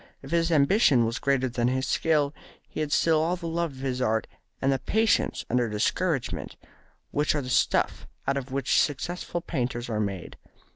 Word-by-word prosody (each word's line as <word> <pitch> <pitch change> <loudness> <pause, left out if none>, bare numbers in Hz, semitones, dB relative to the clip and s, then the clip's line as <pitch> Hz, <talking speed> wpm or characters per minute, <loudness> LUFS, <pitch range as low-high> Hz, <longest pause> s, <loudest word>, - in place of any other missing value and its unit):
If 135 - -10
his 170 0 +2
ambition 145 - +4
was 115 +1 -2
greater 135 -2 +1
than 120 -1 0
his 130 +1 0
skill, 150 -3 +1 0.3
he - - -7
had 155 -1 -2
still 160 0 +3
all 170 +3 +1
the 170 -2 -6
love 165 -2 -1
of - - -13
his 130 -2 -2
art 110 -2 +1 0.3
and 135 - +2
the 135 - +1
patience 220 - +1
under 120 -1 +1
discouragement 135 - -1 0.6
which 150 +1 +1
are 145 - 0
the 125 - -5
stuff - - +1 0.2
out 140 - +2
of 135 -1 -4
which 135 -1 +2
successful 175 +4 -2
painters 120 -6 -3
are 105 - -1
made. 100 -4 -4
135 Hz, 185 wpm, -27 LUFS, 125-160 Hz, 0.6 s, ambition